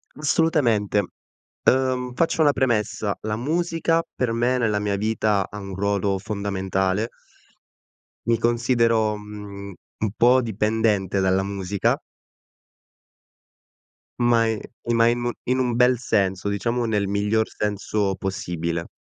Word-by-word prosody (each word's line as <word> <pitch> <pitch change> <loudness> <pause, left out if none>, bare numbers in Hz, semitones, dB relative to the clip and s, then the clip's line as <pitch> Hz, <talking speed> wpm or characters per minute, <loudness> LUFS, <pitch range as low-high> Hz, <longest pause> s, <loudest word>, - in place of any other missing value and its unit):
Assolutamente. 140 -10 +2 0.7
Uhm, 130 -1 0
faccio 165 -1 +1
una 150 -2 +6
premessa: 110 -5 0
la 105 0 -2
musica 165 +5 0
per 125 -3 0
me, 120 +2 +1
nella 110 -4 +1
mia 100 -1 -1
vita, 105 -1 0
ha 105 - -7
un 95 -1 -7
ruolo 100 0 0
fondamentale. 95 0 -1 1.2
Mi 115 0 +2
considero, 115 -2 +2
mhmm, 105 -1 -9 0.3
un 110 -2 -1
po' 125 +3 +5
dipendente 105 -3 0
dalla 95 0 +2
musica. 100 0 -1 2.2
Ma 120 -1 +3
i 110 -1 -1 0.4
ma 115 0 +5
i 120 - +2
mu 120 0 -2
in 130 +1 0
un 125 -2 0
bel 125 0 +4
senso, 95 -4 0
diciamo, 115 +4 -1
nel 105 -3 0
miglior 105 +2 +1
senso 105 -1 -1
possibile. 85 -3 -3
110 Hz, 120 wpm, -23 LUFS, 100-120 Hz, 2.2 s, una